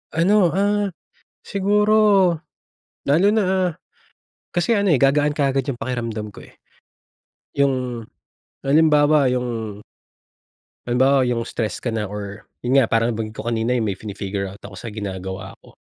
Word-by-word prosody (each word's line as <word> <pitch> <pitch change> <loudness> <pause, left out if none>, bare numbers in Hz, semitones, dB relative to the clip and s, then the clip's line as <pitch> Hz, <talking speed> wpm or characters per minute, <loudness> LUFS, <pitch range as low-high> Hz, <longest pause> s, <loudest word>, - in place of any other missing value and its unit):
Ano, 185 +3 +4
ah, 205 +1 +1 0.5
siguro 205 -2 +3 0.7
lalo 165 +8 +3
na, 215 - +3
ah, 185 -1 +1 0.8
kasi 175 +6 0
ano 200 -2 +2
eh, 155 - +5
gagaan 145 +3 +2
kaagad 135 -2 0
yung 130 - -2
pakiramdam 115 -4 -4
ko - - -12
eh, - - -22 1.0
yung 130 -4 0 0.6
halimbawa 150 -2 +4
yung 115 -5 -3 1.1
Halimbawa 130 +1 +3
yung 115 -1 0
stress 110 -2 -4
ka 120 - -1
na 110 -2 -2
or 100 -1 -7 0.2
yun 130 +3 +4
nga 115 - +3
parang 115 +1 +1
nabangggit 110 -1 -5
ko - - -6
kanina 115 +2 0
yung 110 -4 0
may - - -7
fini-figure 100 -2 -4
out 100 +2 -12
ako 100 -1 -10
sa 115 - -8
ginagawa 95 -2 -6
ko. - - -20
125 Hz, 145 wpm, -21 LUFS, 110-165 Hz, 1.1 s, eh